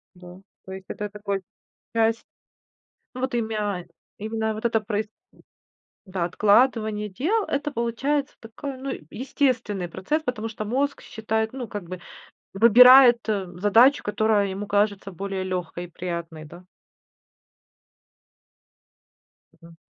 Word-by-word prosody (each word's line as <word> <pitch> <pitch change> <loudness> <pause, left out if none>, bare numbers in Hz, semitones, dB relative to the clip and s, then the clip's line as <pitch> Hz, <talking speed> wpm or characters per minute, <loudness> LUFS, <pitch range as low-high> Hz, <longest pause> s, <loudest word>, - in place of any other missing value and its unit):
Да, 180 0 -13 0.3
то 190 - -10
есть 190 0 -8
это 210 0 -4
такой 200 -1 -4 0.5
часть, 225 0 +1 0.9
ну, 255 - -7
вот 260 -1 -2
имя 210 -6 -2 0.3
именно 220 +1 -2
вот 215 +2 -7
это 230 -1 +2
проис 210 0 -3 1.0
м-да, 185 -2 -2
откладывание 215 +2 +2
дел, 360 - 0
это 285 +1 -2
получается 270 +5 -1
такой, 260 +5 -7
ну, 270 +1 -5
э, - - -5
естественный 240 -7 -1
процесс, 190 - -2
потому 225 -5 -3
что 215 -1 -6
мозг 275 +6 -1
считает, 220 0 -2
ну, 255 -3 -6
как 205 -3 -6
бы, 180 +1 -8 0.5
выбирает, 245 +4 +8
э, 205 -3 0
задачу, 230 +8 +5
которая 210 -1 +1
ему 195 +2 -5
кажется 205 -1 0
более 195 +1 -4
лёгкой 180 -2 -4
и - - -11
приятной, 170 -2 -6
да? 175 +4 -13 2.9
Мгм. 165 -1 -17
215 Hz, 125 wpm, -24 LUFS, 190-240 Hz, 2.9 s, выбирает